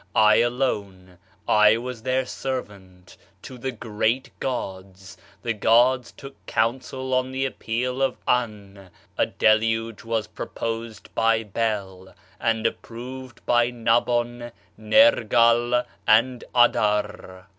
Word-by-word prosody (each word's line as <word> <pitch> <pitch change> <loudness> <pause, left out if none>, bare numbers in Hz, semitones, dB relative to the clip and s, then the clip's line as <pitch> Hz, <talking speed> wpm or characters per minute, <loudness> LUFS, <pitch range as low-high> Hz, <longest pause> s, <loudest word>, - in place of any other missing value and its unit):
[I 110 0 +6
alone, 100 -8 -2 0.3
I 105 +1 +5
was] 125 -1 -6
their 130 +2 0
servant, 100 -9 -7 0.3
to 130 -2 -10
the 130 +2 -3
great 115 +2 -2
gods 95 -6 -6 0.3
[The 115 - -1
gods 120 +4 +3
took 135 0 -13
counsel 130 +3 -2
on 130 0 0
the 135 0 -1
appeal 125 +1 -3
of] 135 -2 0
Ann 100 -6 -2 0.3
[a - - +1
deluge 110 0 +1
was 115 -2 -1
proposed 115 +1 -6
by] 115 0 +2
Bel 100 -3 -4 0.2
[and 115 -1 0
approved 125 +1 -6
by 120 0 +3
Nabon, 120 0 0 0.2
Nergal 120 - +4 0.2
and] 120 +3 +3
Adar. 105 -5 +1
115 Hz, 110 wpm, -24 LUFS, 105-125 Hz, 0.3 s, I